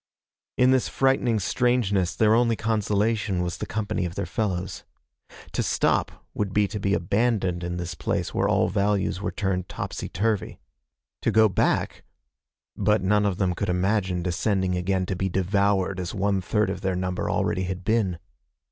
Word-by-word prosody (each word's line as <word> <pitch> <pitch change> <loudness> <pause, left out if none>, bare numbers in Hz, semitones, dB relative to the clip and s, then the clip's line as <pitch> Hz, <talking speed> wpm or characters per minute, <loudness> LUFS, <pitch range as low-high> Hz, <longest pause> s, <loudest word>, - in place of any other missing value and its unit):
In 125 +1 +5
this 130 -1 +2
frightening 130 -4 +2
strangeness, 100 -5 +1
their 110 -1 +4
only 115 0 +3
consolation 105 -3 0
was 85 -1 -4
the - - -4
company 105 -4 -2
of 85 -1 -4
their 100 - -2
fellows. 95 -4 -3 0.7
To - - -1
stop - - 0
would 100 -2 -2
be 105 0 +3
to 105 - -4
be 100 0 +1
abandoned 95 -2 0
in 90 0 -3
this 90 0 -4
place 80 - -2
where - - +1
all - - +3
values 100 -1 0
were - - -1
turned 95 -5 -2
topsy - - -5
turvy. 105 +1 -1 0.6
To - - +1
go 110 0 +5
back 95 - 0 0.7
but 105 0 +2
none 105 +2 +3
of 95 -3 -1
them 95 -2 +1
could 100 +3 -3
imagine 90 -1 0
descending 95 +1 0
again 95 +1 0
to 95 - -3
be 95 +1 -1
devoured 95 0 +1
as 90 +1 -4
one 100 -1 +1
third 105 +2 0
of - - -6
their 95 -1 -1
number 90 0 -2
already 95 - 0
had 95 0 -5
been. 105 -4 +1
100 Hz, 170 wpm, -25 LUFS, 90-105 Hz, 0.7 s, In